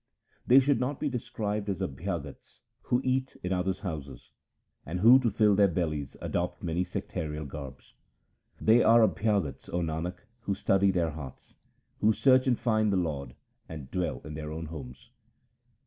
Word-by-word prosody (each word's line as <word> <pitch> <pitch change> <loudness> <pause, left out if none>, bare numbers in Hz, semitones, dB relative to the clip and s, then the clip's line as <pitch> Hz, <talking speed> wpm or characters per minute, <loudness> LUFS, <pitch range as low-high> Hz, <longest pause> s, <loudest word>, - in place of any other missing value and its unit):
They 130 +2 +8
should 135 -1 +2
not 130 +3 -2
be 150 - -1
described 105 -4 -3
as 95 - -2
Abhyagats 75 0 -5 0.2
who 125 +1 +1
eat 130 0 -1
in 90 +1 -1
other's 95 +1 -1
houses, 75 -8 -7 0.5
And 90 +4 -4
who 120 +5 +8
to 120 -3 +1
fill 105 0 +3
their 100 0 +5
bellies 80 -6 -3
adopt 90 0 -3
many 85 +1 0
sectarial 75 -4 -5
garbs. 70 -2 -9 0.7
They 115 +2 +5
are 115 +1 +6
Abhyagats, 100 -13 -1
O 90 - -1
Nanak, 85 +2 -4 0.2
who 100 -4 -2
study 95 +1 +2
their 85 -4 +1
hearts, 70 -4 -10 0.5
Who 110 +1 +4
search 130 +2 +4
and 125 -2 +3
find 110 -3 +1
the 95 - +2
Lord, 75 -6 -3 0.3
and 75 -5 -8
dwell 90 -1 -2
in 75 - -8
their 75 0 -6
own 80 +1 -5
homes. 70 -4 -10
90 Hz, 165 wpm, -29 LUFS, 80-110 Hz, 0.7 s, They